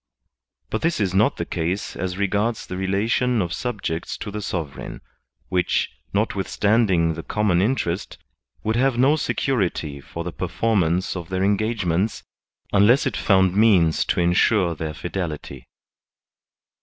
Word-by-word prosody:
But 110 - -1
this 165 -4 0
is 95 -3 0
not 100 +3 +3
the - - -2
case 85 +5 -3
as 90 0 -3
regards 105 +3 0
the 90 - -6
relation 110 +6 +1
of 85 -4 -1
sub 120 -5 -4
jects 80 +1 -3
to 105 - -5
the 105 +1 -4
sovereign, 80 -8 -5 0.5
which, 90 -1 +1 0.2
notwithstanding 100 -3 +1
the 80 - -6
com 105 +4 -1
mon 90 -1 +3
interest, 100 -5 -1 0.5
would 110 +1 0
have 130 0 +2
no 135 +5 +4
security 95 - -1
for 85 +4 -7
the 85 - -4
perform 100 +4 0
ance 85 +4 0
of 85 -2 -6
their 95 0 -1
engagements, 105 -2 0 0.5
unless 120 - +5
it 135 - -1
found 95 -2 +3
means 95 -7 +4
to - - 0
ensure 90 +1 +3
their 80 -1 -5
fidelity. 80 -8 -5
95 Hz, 145 wpm, -23 LUFS, 85-110 Hz, 0.5 s, unless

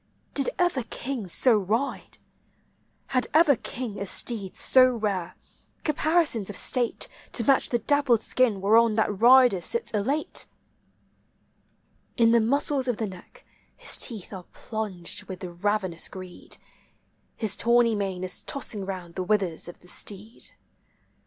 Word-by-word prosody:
Did 275 - +2
ever 350 -7 +1
king 250 -6 -4
so 235 +7 +4
ride? 225 +8 -3 0.9
Had 255 -2 +1
ever 315 -3 +6
king 235 -2 -6
a 200 - -4
steed 200 -2 0
so 255 -1 +4
rare, 195 -6 -3 0.5
caparisons 305 - +1
of 205 - -4
state 245 -3 0 0.3
To 235 - +4
match 270 +3 +3
the 240 - +1
dappled 250 -1 +2
skin 230 -7 +1
whereon 220 +2 +4
that 210 -2 -1
rider 245 -5 +6
sits 470 - -3
elate? 260 +9 0 1.7
In 230 -2 +5
the 235 0 +4
muscles 270 +3 +1
of 245 -4 0
the 225 - -2
neck 185 -3 -12 0.3
his - - +2
teeth 215 -4 -1
are 185 -2 -8
plunged 205 -6 -4
with 185 -1 -8
ravenous 185 0 -1
greed; 185 -1 -7 0.8
His 215 -4 -1
tawny 235 0 +3
mane 195 -3 -3
is 185 0 -3
tossing 235 -8 -2
round 185 -3 -6
the 185 - -3
withers 190 -5 -1
of 175 - -11
the 180 - -19
steed. 205 +5 -4
220 Hz, 140 wpm, -26 LUFS, 190-255 Hz, 1.7 s, ever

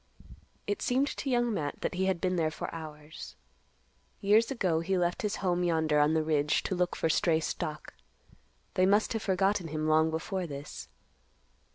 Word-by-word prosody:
It 205 - -2
seemed 265 +3 +1
to 275 - -4
Young 240 -2 +2
Matt 145 -7 -3
that - - -1
he 185 +1 0
had 190 -2 +1
been 185 +1 0
there 160 -2 +1
for 155 - -6
hours. 155 -1 -9 0.8
Years 215 +3 +4
ago 185 -11 +1
he 185 +3 0
left 175 0 0
his 210 -2 -1
home 180 -1 +1
yonder 160 -3 +2
on 150 +2 +3
the 160 - +2
ridge, 150 -1 +1
to - - -2
look 180 -1 0
for - - 0
stray 160 0 +2
stock. 155 -1 -4 0.8
They 185 0 +3
must 205 +3 +3
have 225 - -2
forgotten 195 -2 +1
him 155 0 -2
long 155 +1 +4
before 180 +3 -3
this. 140 -1 -8
175 Hz, 180 wpm, -30 LUFS, 155-195 Hz, 0.8 s, Years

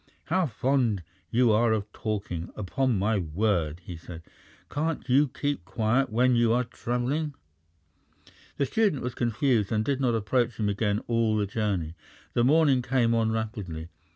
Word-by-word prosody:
"How 180 0 +1
fond 120 -5 0 0.3
you 120 -1 +3
are 115 +2 +3
of 105 -1 -3
talking, 100 -6 -3
upon 120 +4 0
my 105 +2 +1
word!" 85 -2 0
he 90 - -7
said. 85 0 -10 0.4
"Can't 155 +1 -2
you 140 +3 +4
keep 145 -5 -3
quiet 110 +7 +1
when 125 +3 +3
you 120 -1 +3
are 125 +1 +2
travelling?" 125 +5 -2 1.2
The 140 - +2
student 200 - +1
was 125 0 -3
confused, 120 -2 +1
and 110 -1 +1
did 140 -1 0
not 120 -3 +2
approach 120 +2 0
him 105 -1 +1
again 105 +1 0
all 115 -2 +1
the 105 - +1
journey. 100 -6 -2 0.4
The 120 - +2
morning 140 -1 +4
came 120 -2 +2
on 115 -1 +2
rapidly. 105 -8 -4
115 Hz, 155 wpm, -27 LUFS, 105-130 Hz, 1.2 s, you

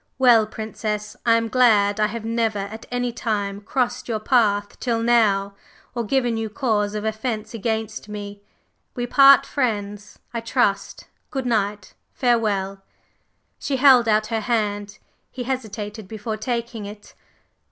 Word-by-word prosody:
Well, 240 -4 +5
Princess, 215 -1 -4
I 230 - +6
am 230 0 +1
glad 215 -4 +3
I 210 - +3
have 220 +1 -6
never 225 -2 0
at 200 +3 -6
any 245 0 -1
time 205 -4 -2
crossed 245 +3 -2
your 225 -3 -1
path 210 -4 +1
till 230 -2 -1
now, 205 -4 +3 0.4
or 235 -1 -2
given 240 0 0
you 225 -1 -3
cause 210 -4 0
of 210 0 -3
offence 220 0 -3
against 220 -1 -3
me. 205 -1 -7 0.5
We 245 -2 -2
part 275 +2 +7
friends, 205 -6 -3 0.2
I 230 - -2
trust? 230 -4 0 0.2
Good 265 -2 -3
night! 210 -4 -1 0.2
Farewell!" 205 -6 0 0.8
She 280 - -2
held 255 -3 +6
out 215 0 +3
her 225 - 0
hand. 205 -2 -1 0.3
He 255 - -6
hesitated 220 -5 -5
before 215 +1 -5
taking 235 -1 -4
it. 205 0 -12
220 Hz, 140 wpm, -22 LUFS, 205-240 Hz, 0.8 s, part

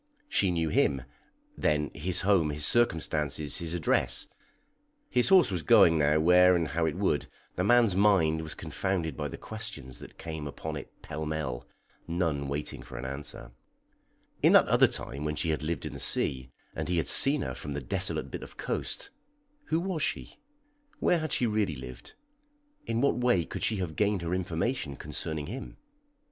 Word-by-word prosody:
She 100 - +2
knew 85 -2 0
him, 70 -3 +2 0.5
then 75 -1 0
his 90 +3 0
home, 95 -6 +3
his 75 0 0
circumstances, 75 - +1
his 85 0 -3
address. 80 -5 +1 0.8
(His 125 +5 +3
horse 185 - +6
was 90 -3 -1
going 80 +2 +6
now 75 +1 +3
where 90 +2 +6
and 85 -3 0
how 80 0 0
it - - -2
would; 95 -7 0 0.3
the 90 - 0
man's 115 -2 +4
mind 95 -6 +3
was 80 -1 -5
confounded 80 0 -2
by - - -3
the - - -7
questions 100 - -8
that - - -12
came 80 -3 -6
upon 80 +2 -6
it 70 - -7
pell 80 +1 -5
mell, 65 -6 -4 0.4
none 80 -5 -1
waiting 70 +2 -4
for - - -10
an - - -6
answer.) 70 -3 -7 0.9
In - - +5
that - - +7
other - - +5
time 70 +3 -5
when 75 0 -2
she 80 +1 0
had 75 - -2
lived 80 +2 -3
in - - -5
the - - -8
sea, 65 -1 +1 0.3
and - - -4
he 90 - +1
had 80 - 0
seen 140 +1 +4
her - - -4
from 75 - -6
the 70 - -3
desolate 65 - -3
bit - - -5
of - - -11
coast, - - -4 0.5
who 160 - 0
was 180 -3 -3
she? - - -3 0.6
Where 175 - +2
had 155 -2 -4
she 125 - +1
really 105 -7 0
lived? 65 -2 -10 0.7
In 115 +1 0
what 140 - +2
way 120 -9 +2
could - - -6
she 110 - +1
have 90 -6 -4
gained 100 -2 +1
her 85 +1 -2
information 90 - -2
concerning 75 +2 -4
him? 125 - -7
80 Hz, 180 wpm, -29 LUFS, 75-100 Hz, 0.9 s, that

